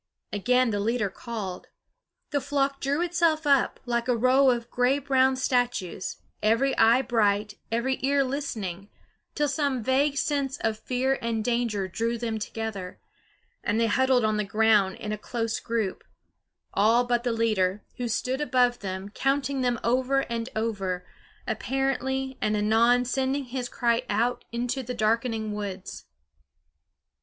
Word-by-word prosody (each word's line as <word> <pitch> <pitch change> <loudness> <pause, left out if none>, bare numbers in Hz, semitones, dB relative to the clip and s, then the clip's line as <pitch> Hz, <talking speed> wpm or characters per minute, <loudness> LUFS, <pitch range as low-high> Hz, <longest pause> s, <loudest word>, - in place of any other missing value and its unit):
Again 250 +4 +2
the 205 - -1
leader 215 -1 0
called. 200 -5 -6 0.6
The 285 -1 +1
flock 275 0 0
drew 280 +4 0
itself 335 -3 +1
up, 280 -3 +3
like 235 -1 -1
a 245 -2 +2
row 260 +3 +5
of 240 -1 -1
gray 250 +3 +2
brown 265 -1 +3
statues, 245 -8 -1 0.2
every 230 +6 +2
eye 230 +4 +5
bright, 210 -3 +1 0.2
every 245 +3 0
ear 275 +1 +3
listening, 215 -9 -4 0.5
till 295 - +1
some 280 -4 -1
vague 275 +4 +2
sense 280 -1 0
of 220 -1 -1
fear 260 +3 0
and 225 -2 -2
danger 235 -5 0
drew 230 +5 -2
them 225 -2 -3
together; 210 -4 -5 0.6
and 210 +2 0
they 230 - +3
huddled 250 +1 +3
on 215 0 +1
the 210 - +1
ground 210 -2 +3
in 210 - -6
a 215 - -3
close 230 -1 -2
group; 225 -5 -2 0.7
all 225 +4 +4
but 240 -1 0
the 245 - 0
leader, 210 -4 +1
who 245 - -2
stood 255 +4 -1
above 250 -3 +2
them, 190 0 -5
counting 270 +3 0
them 245 -2 +1
over 260 +3 +2
and 235 -1 -4
over, 195 -5 -2 0.4
apparently, 265 0 -1
and 215 0 +1
anon 230 +4 +3
sending 265 +2 0
his 250 -1 -4
cry 235 -1 +1
out 235 +4 0
into 245 +3 -2
the 250 0 -5
darkening 220 -1 0
woods. 200 -3 -6
240 Hz, 150 wpm, -26 LUFS, 215-265 Hz, 0.7 s, row